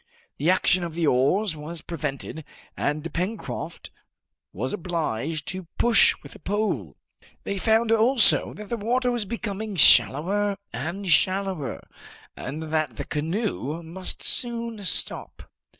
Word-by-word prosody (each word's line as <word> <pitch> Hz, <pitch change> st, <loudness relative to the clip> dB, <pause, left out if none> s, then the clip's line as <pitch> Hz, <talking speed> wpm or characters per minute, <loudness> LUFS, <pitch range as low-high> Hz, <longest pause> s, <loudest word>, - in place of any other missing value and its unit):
The 150 Hz, +5 st, +2 dB
action 185 Hz, -1 st, +3 dB
of 165 Hz, -2 st, -5 dB
the 170 Hz, -1 st, +1 dB
oars 155 Hz, +9 st, +2 dB
was 155 Hz, +2 st, -7 dB
prevented, 155 Hz, -1 st, -5 dB, 0.3 s
and 155 Hz, +2 st, -2 dB
Pencroft 190 Hz, +6 st, -4 dB, 0.6 s
was 125 Hz, +8 st, -3 dB
obliged 160 Hz, -4 st, -2 dB
to 185 Hz, -2 st, -6 dB
push 235 Hz, -3 st, +5 dB
with -, -, -11 dB
a -, -, -13 dB
pole. 185 Hz, -, -2 dB, 0.5 s
They 200 Hz, -, -3 dB
found 225 Hz, +2 st, +3 dB
also 225 Hz, +2 st, +4 dB
that 210 Hz, -1 st, -9 dB
the 235 Hz, -, -1 dB
water 245 Hz, +4 st, +1 dB
was 240 Hz, -3 st, -1 dB
becoming 215 Hz, -1 st, -4 dB
shallower 180 Hz, -, +5 dB, 0.2 s
and 170 Hz, +11 st, -4 dB
shallower, 185 Hz, -, +1 dB, 0.5 s
and 150 Hz, +5 st, -5 dB
that 155 Hz, -6 st, 0 dB
the -, -, -4 dB
canoe 165 Hz, -, -2 dB
must 180 Hz, +3 st, -7 dB
soon 235 Hz, -2 st, 0 dB
stop. -, -, -1 dB
180 Hz, 130 wpm, -25 LUFS, 155-210 Hz, 0.6 s, push